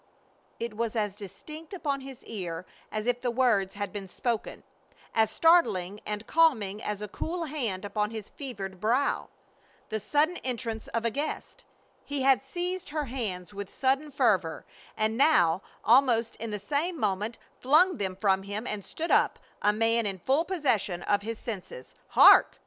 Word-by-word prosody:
It 230 Hz, -2 st, -4 dB
was 230 Hz, +1 st, -2 dB
as 210 Hz, -3 st, -1 dB
distinct 305 Hz, -, -9 dB
upon 280 Hz, -6 st, -2 dB
his 265 Hz, -2 st, -10 dB
ear 180 Hz, -5 st, -5 dB, 0.3 s
as 215 Hz, 0 st, -3 dB
if 245 Hz, 0 st, 0 dB
the 250 Hz, -, 0 dB
words 230 Hz, -6 st, +2 dB
had 205 Hz, 0 st, -4 dB
been 200 Hz, -2 st, -5 dB
spoken; 230 Hz, +4 st, -3 dB, 0.5 s
as 220 Hz, -1 st, +3 dB
startling 210 Hz, -, +3 dB
and 210 Hz, +1 st, -3 dB
calming 220 Hz, -12 st, +2 dB
as 210 Hz, 0 st, -4 dB
a -, -, -4 dB
cool 335 Hz, -, -4 dB
hand 240 Hz, -, -3 dB
upon 210 Hz, +1 st, -1 dB
his 220 Hz, -2 st, -7 dB
fevered 195 Hz, -9 st, -7 dB
brow; 240 Hz, +7 st, +1 dB, 0.6 s
the 220 Hz, -, -2 dB
sudden 305 Hz, -, +1 dB
entrance 235 Hz, -3 st, -4 dB
of 230 Hz, 0 st, -2 dB
a 230 Hz, -, +2 dB
guest. 290 Hz, +6 st, -4 dB, 0.4 s
He 285 Hz, -2 st, -3 dB
had 265 Hz, -5 st, +5 dB
seized 360 Hz, -, -4 dB
her 300 Hz, 0 st, -2 dB
hands 210 Hz, -8 st, -4 dB
with 200 Hz, -1 st, -6 dB
sudden 270 Hz, +3 st, 0 dB
fervor, 205 Hz, -, +1 dB, 0.3 s
and 220 Hz, +1 st, 0 dB
now, 180 Hz, -, +4 dB, 0.2 s
almost 235 Hz, -2 st, +4 dB
in 230 Hz, -, -5 dB
the 210 Hz, -, -3 dB
same 300 Hz, -, -2 dB
moment, 210 Hz, +2 st, -1 dB, 0.2 s
flung 315 Hz, +7 st, +4 dB
them 190 Hz, -2 st, -2 dB
from 195 Hz, -1 st, +2 dB
him 205 Hz, +3 st, -5 dB
and 210 Hz, -4 st, -4 dB
stood 330 Hz, -, -4 dB
up, -, -, +4 dB, 0.2 s
a 210 Hz, -, +4 dB
man 225 Hz, +1 st, +2 dB
in 195 Hz, -1 st, -3 dB
full 270 Hz, -, +1 dB
possession 225 Hz, -, 0 dB
of 205 Hz, 0 st, +2 dB
his 225 Hz, +2 st, -4 dB
senses. 190 Hz, -, -7 dB
"Hark!" -, -, +7 dB
225 Hz, 165 wpm, -28 LUFS, 205-275 Hz, 0.6 s, Hark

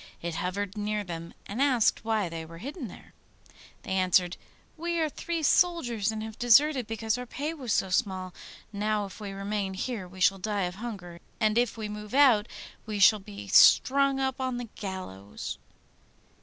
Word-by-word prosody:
It 170 Hz, 0 st, -4 dB
hovered 195 Hz, +3 st, -3 dB
near 210 Hz, 0 st, -2 dB
them, 170 Hz, -2 st, -7 dB
and 215 Hz, +6 st, -4 dB
asked 255 Hz, -7 st, +3 dB
why 220 Hz, -3 st, 0 dB
they 165 Hz, -1 st, -6 dB
were 165 Hz, +1 st, -11 dB
hidden 275 Hz, -, -6 dB
there. -, -, -14 dB, 0.7 s
They -, -, -7 dB
answered, 185 Hz, -1 st, +2 dB, 0.4 s
'We 340 Hz, +1 st, -2 dB
are 315 Hz, -1 st, +1 dB
three 335 Hz, +2 st, -4 dB
soldiers, 245 Hz, -, +2 dB
and 215 Hz, 0 st, -5 dB
have 220 Hz, -1 st, -8 dB
deserted 255 Hz, +1 st, +4 dB
because 225 Hz, +1 st, -1 dB
our 250 Hz, -, -6 dB
pay 295 Hz, +6 st, -4 dB
was 265 Hz, -8 st, -5 dB
so 190 Hz, -2 st, +1 dB
small. 185 Hz, -4 st, -1 dB, 0.4 s
Now 210 Hz, 0 st, 0 dB
if 195 Hz, -, -11 dB
we 205 Hz, -2 st, -6 dB
remain 195 Hz, 0 st, -3 dB
here 205 Hz, -2 st, -4 dB
we 185 Hz, +1 st, -13 dB
shall 195 Hz, +1 st, +3 dB
die 205 Hz, 0 st, -1 dB
of 180 Hz, 0 st, -2 dB
hunger, 185 Hz, -8 st, -7 dB, 0.2 s
and 215 Hz, -2 st, +2 dB
if 240 Hz, -1 st, +1 dB
we 215 Hz, -1 st, -4 dB
move 210 Hz, +2 st, -7 dB
out 245 Hz, -7 st, +5 dB, 0.4 s
we 215 Hz, -1 st, -3 dB
shall 205 Hz, +2 st, +6 dB
be 100 Hz, -, -10 dB
strung 275 Hz, 0 st, +6 dB
up 265 Hz, 0 st, -1 dB
on 255 Hz, -1 st, -1 dB
the 245 Hz, -2 st, -6 dB
gallows. 185 Hz, -, -6 dB
210 Hz, 180 wpm, -28 LUFS, 190-250 Hz, 0.7 s, shall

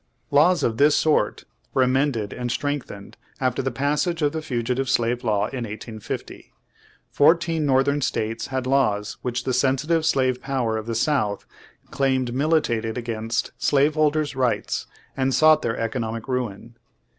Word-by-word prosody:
Laws 165 Hz, +5 st, +4 dB
of 110 Hz, -1 st, 0 dB
this 145 Hz, +1 st, +5 dB
sort 155 Hz, -1 st, +1 dB, 0.3 s
were 130 Hz, -, +4 dB
amended 130 Hz, -5 st, 0 dB
and 125 Hz, -1 st, -3 dB
strengthened 135 Hz, -7 st, -4 dB, 0.2 s
after 130 Hz, -2 st, 0 dB
the 135 Hz, -, -1 dB
passage 150 Hz, +6 st, -1 dB
of 145 Hz, -, +2 dB
the 160 Hz, +1 st, -4 dB
Fugi 125 Hz, -4 st, -2 dB
tive 135 Hz, 0 st, -2 dB
Slave 120 Hz, -2 st, +1 dB
Law 105 Hz, -4 st, +1 dB
in 130 Hz, -3 st, -4 dB
1850, 110 Hz, 0 st, -7 dB, 0.6 s
Fourteen 165 Hz, 0 st, +3 dB
northern 140 Hz, +2 st, +2 dB
states 115 Hz, -2 st, -2 dB
had 130 Hz, -1 st, -3 dB
laws 115 Hz, -6 st, +1 dB
which 120 Hz, -1 st, -3 dB
the 130 Hz, -, -1 dB
sensitive 145 Hz, +6 st, +1 dB
slave 130 Hz, -5 st, +1 dB
pov/er 130 Hz, -5 st, -1 dB
of 110 Hz, 0 st, -4 dB
the 115 Hz, -, -2 dB
South 110 Hz, -6 st, 0 dB, 0.5 s
claimed 130 Hz, -3 st, 0 dB
militated 130 Hz, -6 st, 0 dB
against 115 Hz, -1 st, -2 dB
slaveholders' 150 Hz, +1 st, +2 dB
rights, 130 Hz, -2 st, -1 dB, 0.3 s
and 135 Hz, -1 st, +1 dB
sought 155 Hz, 0 st, +5 dB
their 115 Hz, -, -2 dB
economic 115 Hz, 0 st, -3 dB
ruin. 120 Hz, -2 st, -4 dB
130 Hz, 145 wpm, -23 LUFS, 115-145 Hz, 0.6 s, this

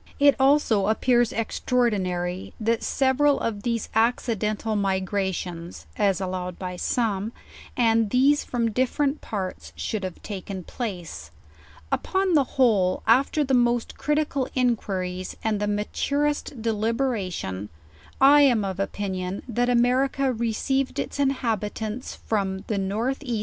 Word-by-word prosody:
It 285 Hz, -1 st, +6 dB
also 265 Hz, -7 st, +3 dB
appears 240 Hz, +2 st, +3 dB
extraordinary, 190 Hz, -7 st, -1 dB
that 230 Hz, +1 st, +1 dB
several 275 Hz, +2 st, +2 dB
of 210 Hz, -3 st, -2 dB
these 230 Hz, 0 st, -1 dB
acci 230 Hz, +1 st, +2 dB
dental 215 Hz, +1 st, -1 dB
migrations, 190 Hz, -3 st, -2 dB
as 195 Hz, -3 st, +2 dB
allowed 185 Hz, -2 st, -4 dB
by 180 Hz, -1 st, -5 dB
some, 215 Hz, +1 st, -1 dB, 0.4 s
and 225 Hz, -3 st, +3 dB
these 275 Hz, +5 st, +4 dB
from 235 Hz, -2 st, -1 dB
differ 255 Hz, +5 st, 0 dB
ent 280 Hz, +1 st, 0 dB
parts, 190 Hz, -4 st, -5 dB
should 215 Hz, -3 st, -3 dB
have 185 Hz, -2 st, -5 dB
taken 195 Hz, -2 st, -6 dB
place. 175 Hz, -, -6 dB, 0.6 s
Upon 380 Hz, -1 st, +1 dB
the 295 Hz, -3 st, +5 dB
whole, 205 Hz, -8 st, +3 dB
af 250 Hz, +5 st, +4 dB
ter 305 Hz, -, +1 dB
the 270 Hz, -1 st, -1 dB
most 240 Hz, -1 st, +2 dB
critical 295 Hz, -3 st, 0 dB
inquiries, 190 Hz, -7 st, -1 dB
and 215 Hz, -2 st, 0 dB
the 210 Hz, -, -1 dB
maturest 280 Hz, +7 st, -1 dB
deliberation, 215 Hz, -, -1 dB, 0.5 s
I 285 Hz, +2 st, +7 dB
am 240 Hz, -7 st, +4 dB
of 190 Hz, -1 st, -4 dB
opinion, 190 Hz, -1 st, -3 dB
that 245 Hz, +1 st, 0 dB
America 255 Hz, +2 st, +2 dB
received 235 Hz, +4 st, -1 dB
its -, -, -3 dB
inhabitants 225 Hz, -4 st, -1 dB
from 195 Hz, -3 st, -2 dB
the -, -, -2 dB
N. 210 Hz, +6 st, -1 dB
E. 240 Hz, -6 st, -2 dB
225 Hz, 130 wpm, -25 LUFS, 195-255 Hz, 0.6 s, I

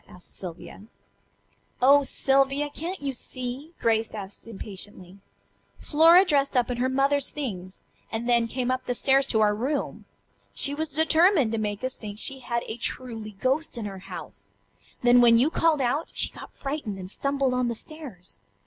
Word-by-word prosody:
asked 180 Hz, -, -8 dB
Sylvia. 180 Hz, 0 st, -6 dB, 1.0 s
"Oh, 280 Hz, +3 st, +6 dB
Sylvia! 275 Hz, +1 st, +1 dB
Can't 340 Hz, +2 st, -5 dB
you 275 Hz, -1 st, -2 dB
see?" 255 Hz, +4 st, -5 dB
Grace 225 Hz, -1 st, +1 dB
asked 200 Hz, +1 st, -8 dB
impatiently. 195 Hz, -3 st, -7 dB, 0.6 s
"Flora 330 Hz, +5 st, +6 dB
dressed 280 Hz, -5 st, +1 dB
up 245 Hz, 0 st, +2 dB
in 245 Hz, -, -3 dB
her 255 Hz, +2 st, +1 dB
mother's 275 Hz, +1 st, +2 dB
things, 190 Hz, -10 st, -6 dB, 0.3 s
and 230 Hz, +1 st, -3 dB
then 235 Hz, -1 st, +3 dB
came 250 Hz, +2 st, -2 dB
up 255 Hz, 0 st, -3 dB
the 245 Hz, -, 0 dB
stairs 270 Hz, +2 st, +3 dB
to 220 Hz, -4 st, +2 dB
our 210 Hz, -1 st, +4 dB
room. 265 Hz, +7 st, -3 dB, 0.5 s
She 280 Hz, -, +2 dB
was 315 Hz, +2 st, -3 dB
determined 320 Hz, -, +4 dB
to 225 Hz, -, -1 dB
make 210 Hz, +1 st, -3 dB
us 255 Hz, 0 st, -3 dB
think 205 Hz, -2 st, -8 dB
she 270 Hz, +4 st, -5 dB
had 235 Hz, -1 st, -2 dB
a 220 Hz, -, -5 dB
truly 225 Hz, -3 st, -4 dB
ghost 265 Hz, +3 st, 0 dB
in 225 Hz, -, -4 dB
her 195 Hz, -2 st, -6 dB
house. -, -, -10 dB, 0.5 s
Then 245 Hz, 0 st, +6 dB
when 230 Hz, -1 st, +7 dB
you 270 Hz, +7 st, +3 dB
called 325 Hz, -4 st, +2 dB
out, 275 Hz, +6 st, 0 dB
she -, -, +1 dB
got -, -, -11 dB
frightened 275 Hz, -8 st, -5 dB
and 185 Hz, -1 st, -7 dB
stumbled 275 Hz, 0 st, 0 dB
on 250 Hz, -1 st, +1 dB
the 235 Hz, -, -2 dB
stairs. 250 Hz, -, -10 dB
250 Hz, 175 wpm, -26 LUFS, 220-280 Hz, 1.0 s, when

